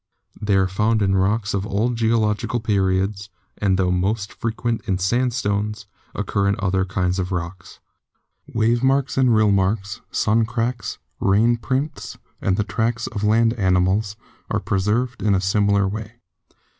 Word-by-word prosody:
They 105 -1 +1
are 95 -1 +3
found 105 +3 +1
in 95 0 +2
rocks 100 +2 +1
of 100 -1 -1
all 105 +3 0
geological 115 -1 0
periods, 100 -1 0 0.3
and 95 -2 +2
tho 90 -1 +1
most 100 +3 -1
frequent 115 0 -2
in 95 - +1
sandstones, 105 0 -1 0.3
occur 100 -1 0
in 100 - +2
other 95 -1 0
kinds 90 0 -1
of 90 +1 -2
rocks. 90 +1 -5 0.7
Wave 115 +1 +2
marks 135 0 +1
and 130 -3 +4
rill 110 -1 +4
marks, 100 +1 0
sun 110 +2 +2
cracks, 115 +1 -3 0.2
rain 110 +5 +3
prints, 135 +5 -3 0.2
and 95 -1 +1
the 105 - +1
tracks 115 +3 -1
of 105 - -5
land 115 +2 +3
animals, 95 0 +1 0.3
are - - 0
preserved 115 +5 -1
in 105 -2 +2
a - - +2
similar 100 +1 +2
way. 105 +2 -5
105 Hz, 150 wpm, -22 LUFS, 95-115 Hz, 0.7 s, and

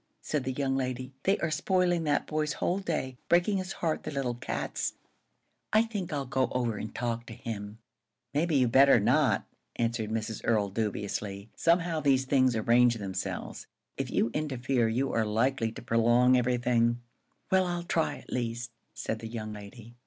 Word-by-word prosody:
said 150 -4 -1
the 130 - -1
young 135 0 -1
lady. 130 0 -3
"They 195 +2 +4
are 170 - 0
spoiling 175 -1 +1
that 145 -1 +1
boy's 155 -2 -1
whole 180 +6 0
day, 135 -9 -3
breaking 175 +4 +4
his 185 0 -4
heart, 160 -2 -1
the - - -5
little 135 -4 -1
cats! 120 - -3 0.8
I 215 +1 +5
think 210 -6 -4
I'll 140 -2 -2
go 130 0 +1
over 120 -4 0
and 110 - -6
talk 120 -1 -2
to - - -7
him." 105 -3 -6 0.6
"Maybe 155 +2 +1
you 130 -2 +5
had 115 - -1
better 135 0 +7
not," 130 +7 +3 0.3
answered 115 -2 -1
Mrs. 110 -1 -3
Earl, 105 -4 +2
dubiously. 100 -1 -3
"Somehow 170 -1 +2
these 135 -3 +3
things 130 -2 +3
arrange 120 +2 +4
themselves. 95 -4 -5 0.3
If - - -3
you 115 - +1
interfere, 130 -5 0
you 130 +5 0
are 115 - +2
likely 115 +2 +1
to - - -9
prolong 120 +2 +4
everything." 120 -1 +2 0.5
"Well, 190 -1 +4
I'll 175 -1 -2
try, 160 -4 0
at - - -10
least," 120 -1 -2 0.2
said 110 - -3
the 115 - -6
young 110 -2 -5
lady. 105 +3 -11
125 Hz, 175 wpm, -29 LUFS, 115-150 Hz, 0.8 s, better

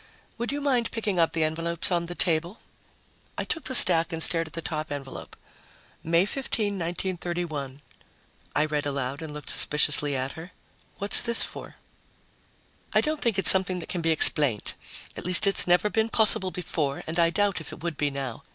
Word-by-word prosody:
Would 235 - -4
you 290 +1 -5
mind 255 -5 -1
picking 210 -5 -4
up 165 - 0
the 165 -1 -2
envelopes 165 +3 0
on 170 -1 -2
the 175 - -8
table?" 170 +5 -2 0.8
I - - -3
took 325 - -4
the 260 - -2
stack 170 -6 +6
and 165 0 -3
stared 165 -1 -1
at - - -17
the 165 - -5
top 155 -2 -6
envelope. 140 -2 -9 0.7
"May 170 +3 +1
15, 235 -1 -4
1931," 170 -6 -6 0.7
I 150 - +1
read 150 -1 -4
aloud, 140 0 -5
and 160 -2 -8
looked 150 0 -4
suspiciously 150 -1 +3
at 130 +1 -4
her. 165 +3 -13 0.4
"What's 200 +1 +1
this 235 -1 +1
for?" - - -10 1.2
"I - - +2
don't 310 -1 -3
think 230 -4 -1
it's 195 - +11
something 185 -1 +1
that 175 - -9
can 175 - -5
be 165 - -2
explained. 145 -7 +6 0.4
At - - -8
least 180 +4 +4
it's 195 -2 +1
never 180 +4 +2
been 220 +1 -2
possible 220 -4 +1
before 165 -6 -5
and 165 +2 -5
I 170 0 +2
doubt 200 +3 -2
if - - -10
it 160 - -13
would 170 -2 -5
be 145 0 -2
now. 135 -4 -7
170 Hz, 190 wpm, -24 LUFS, 150-195 Hz, 1.2 s, it's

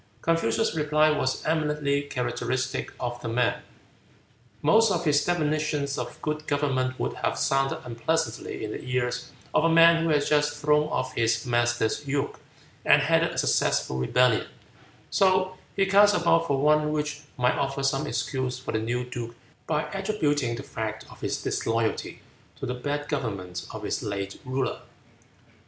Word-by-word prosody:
Confucius' 165 +7 +1
reply 155 0 +3
was 130 -3 -1
eminently 150 -2 +1
characteristic 130 -1 -2
of 120 -1 -4
the - - -5
man. 120 +1 +1 1.0
Most 220 +8 +5
of 175 -2 -1
his 145 -2 +3
definitions 155 -4 0
of - - -5
good 155 0 -3
government 130 -3 0
would - - -1
have - - -1
sounded 135 0 +1
unpleasantly 160 +8 -2
in 105 - -5
the - - -5
ears 125 -1 -2 0.2
of - - +3
a 165 - +4
man 165 0 +6
who 165 - 0
had 150 -2 +2
just 150 -1 +2
thrown 150 0 +3
off - - -2
his 115 +3 +1
master's 120 +2 0
yoke 140 0 -2 0.4
and - - +5
headed - - +3
a - - -8
successful 65 - +1
rebellion, 125 - +2 0.6
so 185 -1 +3 0.2
he 195 - +3
cast 205 +2 +5
about 165 -1 +3
for 140 -1 +1
one 150 +1 +3
which 150 0 -2 0.2
might 125 0 +2
offer 135 0 -1
some 135 0 +1
excuse 130 -2 -2
for 130 - -6
the 110 - 0
new 120 +3 -1
duke 120 -1 -6 0.3
by 155 -1 +1
attributing 150 - 0
the 130 - -7
fact 110 -5 -5
of - - -15
his - - -2
disloyalty 115 -1 -1 0.3
to - - -6
the 125 - -2
bad 145 +3 -3
government 100 - -4
of - - -8
his - - -2
late 100 -1 -4
ruler. 130 +1 -2
145 Hz, 160 wpm, -26 LUFS, 125-155 Hz, 1.0 s, man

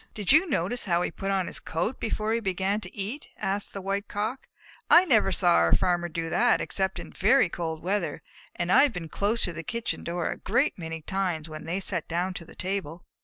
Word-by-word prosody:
"Did 205 -3 +1
you 320 +5 +5
notice 215 - -1
how 175 -2 +2
he - - -2
put 195 +3 -4
on 195 -2 +1
his - - -4
coat 175 +10 -2
before 220 0 -1
he 230 - +1
began 195 0 -1
to 180 0 -7
eat?" 215 +9 -4
asked 200 0 -2
the 195 - -6
White 200 +1 -2
Cock. 215 +6 -3 0.4
"I 350 +2 +8
never 220 - +4
saw 175 -1 +4
our 85 0 +4
Farmer 175 -2 +1
do 165 0 -3
that 245 - +4
except 190 -1 -1
in - - -8
very 215 0 +4
cold 160 -2 -4
weather, 200 +4 -1 0.3
and - - -1
I - - +7
have 285 -4 +4
been 165 -3 -6
close 210 +7 0
to 175 - 0
the 165 - -5
kitchen 235 +5 -3
door 170 0 -2
a - - -5
great 250 +9 +1
many 165 -2 -6
times 180 -4 -2
when 155 -1 -8
they 175 +4 -2
sat 185 -4 -3
down 175 +3 -1
to 170 - -6
the - - -15
table." 185 -3 -4
190 Hz, 225 wpm, -27 LUFS, 170-215 Hz, 0.4 s, I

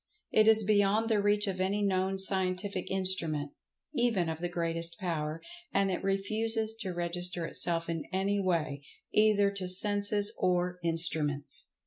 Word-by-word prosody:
It 215 0 +4
is 220 -1 +5
beyond 210 +2 +2
the 215 -2 +2
reach 205 +1 +2
of 190 -2 -3
any 200 +2 0
known 190 0 0
scientific 190 0 -1
instrument, 170 -6 -2 0.4
even 225 -9 +1
of 160 0 -5
the 175 +1 -3
greatest 165 -1 -1
power, 160 -3 -3 0.3
and 195 -1 +1
it 180 - -3
refuses 215 +3 0
to 195 -5 -3
register 175 0 0
itself 165 +1 +1
in 165 -2 -4
any 195 +2 0
way, 155 -7 -1 0.3
either 210 -2 +3
to 195 -2 -4
senses 205 +2 +3
or 180 0 0
instruments. 160 -4 +1
185 Hz, 145 wpm, -30 LUFS, 170-205 Hz, 0.4 s, is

